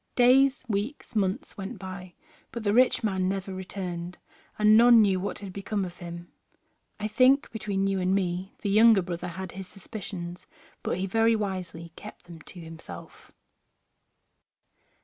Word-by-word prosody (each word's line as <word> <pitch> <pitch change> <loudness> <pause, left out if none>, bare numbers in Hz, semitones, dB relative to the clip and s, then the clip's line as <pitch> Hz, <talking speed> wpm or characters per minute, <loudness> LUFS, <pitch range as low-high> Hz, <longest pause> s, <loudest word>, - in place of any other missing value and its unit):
Days, 260 +2 +5
weeks, 225 +4 -3
months 210 +7 -1
went 195 0 -5
by, 185 -2 -8 0.4
but 235 -1 -6
the 205 -1 +1
rich 250 +1 +4
man 190 -3 0
never 195 0 -3
returned, 180 -2 -6 0.4
and 215 0 +6
none 235 +1 +8
knew 195 -3 +3
what 200 +2 -4
had 195 -3 -8
become 200 0 -2
of 180 -1 -9
him. 170 0 -9 0.7
I 210 - -2
think, 255 +6 +4
between 200 -3 -2
you 195 -1 0
and 185 +1 +1
me, 185 0 -2
the 200 - 0
younger 215 -1 +6
brother 175 0 -5
had 185 +1 -6
his 190 0 -8
suspicions 185 -3 -8 0.3
but - - -2
he 190 - -1
very 225 +3 +3
wisely 180 -5 -4
kept 210 - -11
them 170 -2 -12
to 180 - -12
himself. 165 -1 -11
195 Hz, 155 wpm, -27 LUFS, 180-215 Hz, 0.7 s, none